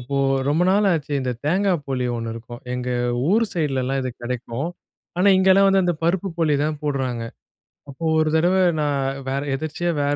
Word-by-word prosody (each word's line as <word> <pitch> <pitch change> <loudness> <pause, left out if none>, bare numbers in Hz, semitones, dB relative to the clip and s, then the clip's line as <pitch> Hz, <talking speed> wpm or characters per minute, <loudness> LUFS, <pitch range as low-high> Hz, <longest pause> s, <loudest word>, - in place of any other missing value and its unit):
இப்போ 140 +3 -4 0.3
ரொம்ப 155 +5 +2
நாள் 205 +1 +3
ஆச்சு. 150 -3 -2
இந்த 125 -1 -1
தேங்கா 190 +5 +2
போளி 130 -2 -2
ஒண்ணு 115 -1 -4
இருக்கும். 120 +1 -9
எங்க 125 0 -3 0.4
ஊர் 225 +3 +4
சைடிலலாம் 135 -4 -1
இது 130 - -2
கிடைக்கும். 125 +4 -3 0.5
ஆனா, 195 - +4
இங்கேலாம் 190 +1 +5
வந்து 195 0 +4
அந்த 175 -1 +1
பருப்பு 180 +3 +1
போளி 155 -3 +2
தான் 155 -1 -2
போடுறாங்க. 130 -5 -2 0.7
அப்போ 140 +4 -9 0.2
ஒரு 155 - +2
தடவ 175 +3 +3 0.3
நான் 145 -2 0 0.3
வேற 135 +1 -1
எதர்ச்சியா 155 +4 -3
வேற 145 0 +1
145 Hz, 170 wpm, -22 LUFS, 130-175 Hz, 0.7 s, இங்கேலாம்